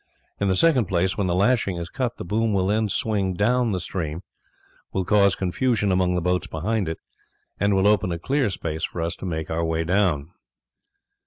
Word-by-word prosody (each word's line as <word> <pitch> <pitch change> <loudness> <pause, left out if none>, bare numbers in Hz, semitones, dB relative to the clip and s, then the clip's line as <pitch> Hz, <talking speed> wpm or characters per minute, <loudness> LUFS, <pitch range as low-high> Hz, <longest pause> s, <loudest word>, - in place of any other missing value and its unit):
In 100 - +1
the 95 - +2
second 130 - +4
place, 90 0 0
when 100 -3 -1
the 90 - +1
lashing 100 -2 +2
is 85 0 -4
cut 125 +6 -3
the - - -6
boom 110 +4 0
will 95 -2 +1
then 105 +2 +1
swing 100 -3 0
down 120 +4 +2
the 95 - -1
stream, 85 -1 -4 0.7
will 95 -1 -1
cause 100 0 +4
confusion 105 +2 0
among 90 -1 +2
the 90 - -1
boats 90 0 0
behind 95 +3 -2
it, 80 - -4 0.6
and 100 0 +2
will 95 0 +2
open 100 -3 +3
a 85 - -2
clear 135 - 0
space 80 -4 -4
for - - -3
us 85 - -2
to - - -6
make 80 -2 -4
our 80 +1 0
way 80 0 0
down." 85 -4 +1
95 Hz, 200 wpm, -24 LUFS, 85-105 Hz, 0.7 s, second